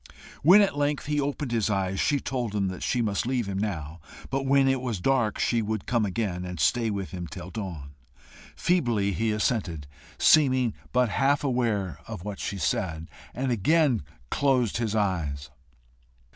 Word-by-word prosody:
When 185 +8 +8
at 200 -5 +2
length 145 0 0
he 150 0 0
opened 140 -1 -3
his 115 -3 +1
eyes, 95 -2 -1
she 145 - +2
told 120 -5 -3
him 95 -2 -1
she 125 -2 0
must 105 +1 -1
leave 125 -3 0
him 100 -1 -3
now, 85 -6 -4 0.3
but 135 0 -1
when 135 0 +4
it 135 -1 +1
was 120 -6 -3
dark 120 -1 +1
she 120 -1 +1
would 110 -1 -3
come 115 -4 +1
again, 95 -3 -2
and 90 -2 -6
stay 115 +9 +2
with 100 -3 -4
him 90 -2 -5
till 90 +4 -8
dawn. 85 -9 -6 0.6
Feebly 120 - +1
he 110 +6 0
assented, 105 - -1 0.3
seeming 130 -6 +4 0.2
but 125 -2 +2
half 140 +7 +2
aware 115 - 0
of 110 -6 -7
what 105 -2 -5
she 100 - -3
said, 80 0 -2 0.2
and 130 +1 -1
again 130 - +3 0.3
closed 130 -7 +2
his 110 -2 -1
eyes. 80 -9 -1
110 Hz, 170 wpm, -26 LUFS, 95-130 Hz, 0.6 s, When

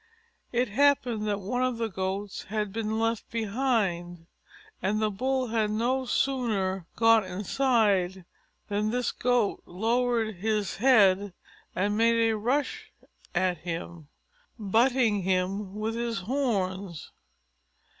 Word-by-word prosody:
It 245 +1 +1
happened 245 -3 +2
that 205 -1 -1
one 245 +6 -2
of 255 -2 0
the 230 -1 -1
Goats 190 0 -4
had 210 -1 -3
been 220 0 -2
left 225 -1 -1
behind, 205 -7 -1 0.6
and 200 +3 0
the 215 -1 +1
Bull 255 +4 -1
had 220 -2 +1
no 245 +5 0
sooner 205 -10 0
got 225 -1 +5
inside 195 -2 +1 0.4
than 210 +1 0
this 245 +1 0
Goat 245 -4 0
lowered 225 +2 0
his 210 +1 -1
head 205 -6 +4 0.4
and 205 +3 0
made 230 0 +4 0.2
a - - 0
rush 290 - -1 0.4
at 180 -1 +1
him, 170 -2 -6 0.5
butting 225 0 +2
him 190 +2 -1
with 215 +1 -2
his 230 -3 -2
horns. 195 - -2
215 Hz, 120 wpm, -27 LUFS, 190-240 Hz, 0.6 s, got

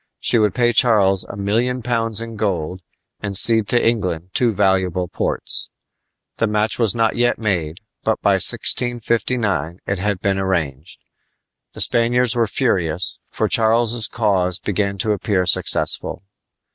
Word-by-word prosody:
She 120 - +1
would 105 -3 +1
pay 120 -1 +2
Charles 100 -5 +3
a - - -9
million 115 +5 -1
pounds 115 -2 0
in 115 -1 -7
gold 90 -4 -3 0.4
and 100 -2 -1
cede 110 0 +5
to 120 - +1
England 90 -6 -2
two 120 -2 +2
valuable 95 -3 0
ports. - - -2 0.7
The 115 - +1
match 105 +2 -1
was 115 -4 +2
not 115 -1 +1
yet 120 0 +1
made, 90 -5 -3 0.2
but - - 0
by - - +2
1659 115 -7 +1
it 100 -1 -3
had 100 -1 -2
been 95 0 -1
arranged. 80 -6 -3 0.7
The - - -4
Spaniards 120 +1 +2
were 115 -2 +1
furious, 95 -8 0
for - - -2
Charles's 115 0 +2
cause 95 -6 0
began 100 -1 -2
to 105 +3 -1
appear 100 -2 -1
successful. 90 +1 +1
105 Hz, 145 wpm, -19 LUFS, 95-115 Hz, 0.7 s, cede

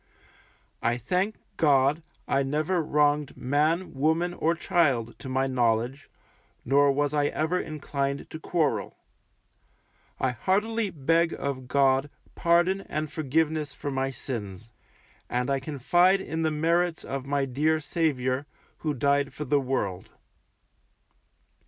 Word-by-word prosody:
I 120 +1 +1
thank 180 - -1 0.2
God, 145 0 +3 0.3
I 135 - +2
never 155 +6 0
wronged 150 -1 +1
man, 155 +7 0
woman, 160 +5 +1
or 165 0 +1
child, 135 -10 +1
to 130 - -7
my 130 +1 +1
knowledge, 120 +1 0 0.6
nor 140 +2 +4
was 145 +1 0
I 145 -1 +2
ever 160 +5 0
inclined 140 -2 -3
to 160 - -6
quarrel. 160 -3 -1 1.2
I 130 - +1
heartily 210 - 0
beg 165 +2 +1
of 130 -2 -4
God 135 +1 +3 0.2
pardon 175 +3 +2
and 155 -1 -3
forgiveness 155 -1 0
for 145 - -4
my 135 0 -1
sins, 115 -5 -6 0.6
and 125 +2 -1
I 135 - +1
confide 175 +7 +3
in 160 -3 -4
the 160 - +2
merits 165 +2 +1
of 135 -1 -5
my 140 -1 +1
dear 150 +5 +1
Saviour, 145 -4 -1 0.3
who 150 -2 -2
died 140 +1 +1
for 150 - -4
the 145 +1 +2
World. 100 -9 -2
145 Hz, 125 wpm, -27 LUFS, 135-160 Hz, 1.2 s, nor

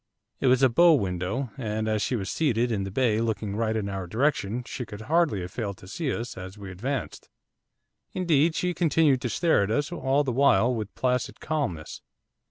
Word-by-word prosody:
It 135 - +1
was 130 +1 +4
a - - +8
bow 170 +7 +6
window, 100 +3 -2
and 110 -2 -2
as 110 -1 0
she 125 - 0
was 100 -5 -3
seated 120 -6 +1
in 100 -3 -1
the - - -4
bay 110 +1 +1
looking 110 -3 -2
right 110 0 0
in 105 -2 -1
our 95 -2 -4
direction 125 - 0
she 125 - -5
could 105 -2 -9
hardly 150 - +1
have 90 +1 -6
failed 100 -5 -4
to 90 - -14
see 140 - -3
us 115 +1 -4
as 95 +2 -8
we 100 -2 -8
advanced, 125 +7 -4 0.8
indeed 165 -3 +2
she 180 0 0
continued 155 -6 +3
to 120 - -2
stare 165 - +2
at 100 - 0
us 145 +9 0
all 145 -4 +1
the 135 - -1
while 125 -2 +4
with 110 -3 -5
placid 125 -1 -1
calmness. 135 - -3
120 Hz, 200 wpm, -26 LUFS, 100-140 Hz, 0.8 s, a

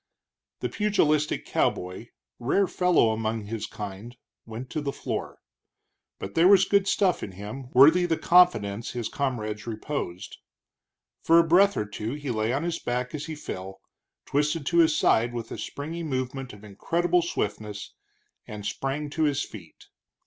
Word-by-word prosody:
The - - -1
pugilistic 155 -8 +1
cowboy, 90 +6 -1 0.3
rare 140 +11 +2
fellow 180 -11 +3
among 110 0 -2
his 110 +1 -4
kind, 105 +4 -8 0.3
went 115 +3 -7
to 155 - -2
the 140 -1 -2
floor. - - -5 0.8
But 95 - -7
there 170 +2 +5
was 195 -1 +7
good 200 -1 +2
stuff 190 -4 +2
in 95 - -6
him, 105 +7 -8
worthy 160 +8 +7
the 165 -2 +1
confidence 115 - +3
his 120 -3 -3
comrades 110 -6 -3
reposed. 110 -5 -5 0.8
For 165 - +5
a 170 - +7
breath 195 +4 +5
or 105 - 0
two 105 +3 -5
he 145 -3 -4
lay 110 0 0
on 135 +5 -1
his 170 -1 -2
back 125 +1 -3
as 150 0 -5
he 160 - -5
fell, 95 -9 -7 0.5
twisted 150 +1 0
to 170 +3 +2
his 160 -2 +4
side 120 -1 +2
with 115 -1 -5
a - - -5
springy 160 +4 -5
movement 130 -3 -3
of 105 0 -14
incredible 170 - 0
swiftness, 105 -10 -4 0.5
and 105 -1 -8
sprang 135 +7 -3
to 160 +1 +1
his 145 -1 +1
feet. 85 -7 -12
130 Hz, 160 wpm, -26 LUFS, 110-160 Hz, 0.8 s, was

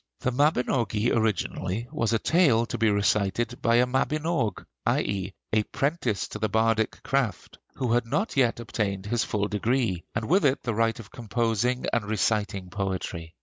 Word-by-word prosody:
The 130 - 0
'Mabinogi' 125 -5 +1
originally 110 0 -1
was 115 -1 0
a 115 - +3
tale 135 -5 +3
to 120 - -4
be 115 -1 +4
recited 105 +3 0
by 115 0 +3
a 120 +1 +5
mabinog, 140 - -1 0.2
i. - - +2
e., 95 -1 -3 0.2
a 110 - +4
'prentice 135 - -1
to - - -6
the 110 - 0
bardic 110 +1 +1
craft 135 -5 -2 0.2
who 125 -3 0
had 120 -1 +1
not 195 - -1
yet 125 -4 +2
obtained 100 -4 -2
his 115 +2 0
full 105 -1 -1
degree, 105 -3 0
and 110 0 -2
with 185 +6 +3
it 140 -1 +2
the 120 - -1
right 115 +1 +1
of 110 - -11
composing 120 +1 -1
and 120 -3 +1
reciting 105 -3 -1
poetry. 90 -4 -4
115 Hz, 170 wpm, -26 LUFS, 105-125 Hz, 0.2 s, a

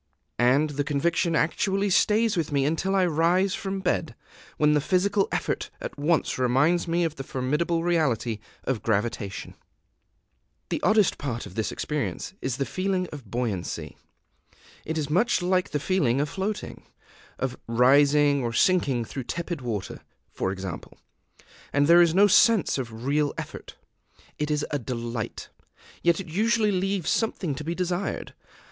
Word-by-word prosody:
And 135 +5 +3
the 145 0 -1
conviction 165 +4 0
actually 195 +5 +1
stays 215 +3 +3
with 160 -3 -1
me 140 -1 +1
until 170 +6 0
I 190 -1 +4
rise 175 +4 +2
from 195 0 -3
bed, - - -1 0.4
when 150 0 +4
the 150 - +3
physical 195 +5 +1
effort - - -2
at - - -6
once 155 -2 +1
reminds 140 +8 +2
me 170 +1 +1
of 160 -2 -2
the 135 - -5
formidable 150 +7 -1
reality 135 -10 0 0.2
of 130 -5 -2
gravitation. 105 -2 -2 1.2
The - - -2
oddest 215 -3 +3
part 125 -5 -4
of - - -11
this 110 +2 -2
experience 150 +4 -3
is 130 -2 -2
the 135 - -1
feeling 185 +1 -1
of 135 -8 -10
buoyancy. 110 -6 -3 0.9
It 160 +1 -3
is 150 -2 -2
much 200 +3 +2
like 185 0 +1
the 150 - -1
feeling 140 -7 +1
of 145 +1 0
floating, 195 +4 -4 0.6
of 130 -1 -2
rising 140 +4 +4
or 115 -1 -2
sinking 135 -5 +2
through 130 +2 -6
tepid 170 -1 -4
water, 110 -6 -4 0.3
for 95 - -1
example; 95 -3 -7 0.7
and 145 0 +3
there 170 +3 +7
is 170 -1 +3
no 200 +2 +7
sense 205 - +4
of 120 -2 -6
real 145 +1 +1
effort. - - -8 0.6
It 150 0 -1
is 150 -1 0
a 145 - 0
delight; 115 -2 -5 0.5
yet 170 0 +3
it 195 - -5
usually 215 +5 +2
leaves 190 -1 0
something 190 -8 -1
to 140 - -6
be 165 +3 -3
desired. 180 +2 -3
150 Hz, 155 wpm, -26 LUFS, 130-185 Hz, 1.2 s, there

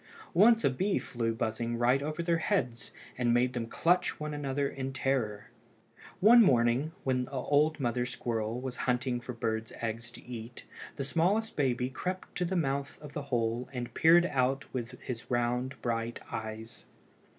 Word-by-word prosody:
Once 225 +6 +6
a - - +5
bee 190 +10 0
flew 115 -2 -2
buzzing 115 +1 -2
right 125 +3 +3
over 155 +3 -3
their 170 -1 +1
heads, 135 - -1 0.3
and 120 -1 +2
made 125 +1 +2
them 120 -2 -3
clutch 175 +9 +1
one 150 0 -4
another 140 -1 -1
in 135 -1 -4
terror. 125 -7 -1 0.7
One 230 +5 +8
morning, 125 - +3
when 130 -1 +1
the - - -15
old 145 +4 +2
mother 125 -1 0
squirrel 115 -2 -2
was 125 -1 -5
away - - -4
hunting 125 -1 0
for 125 - -6
birds' 110 -1 -2
eggs 115 +1 -3
to 120 - -12
eat, 120 -1 -8 0.3
the 140 - -3
smallest 185 +10 +1
baby 125 -3 0
crept 185 +7 -4
to 180 - +1
the 185 +2 -2
mouth 140 -3 -1
of 150 -1 -10
the 150 - -3
hole 120 0 0
and 125 -1 -5
peeped 170 +2 +6
out 135 -3 +1
with 125 0 -5
his 120 -2 -6
round 125 +2 0
bright 115 0 -2
eyes. 110 +1 -6
125 Hz, 175 wpm, -30 LUFS, 120-150 Hz, 0.7 s, One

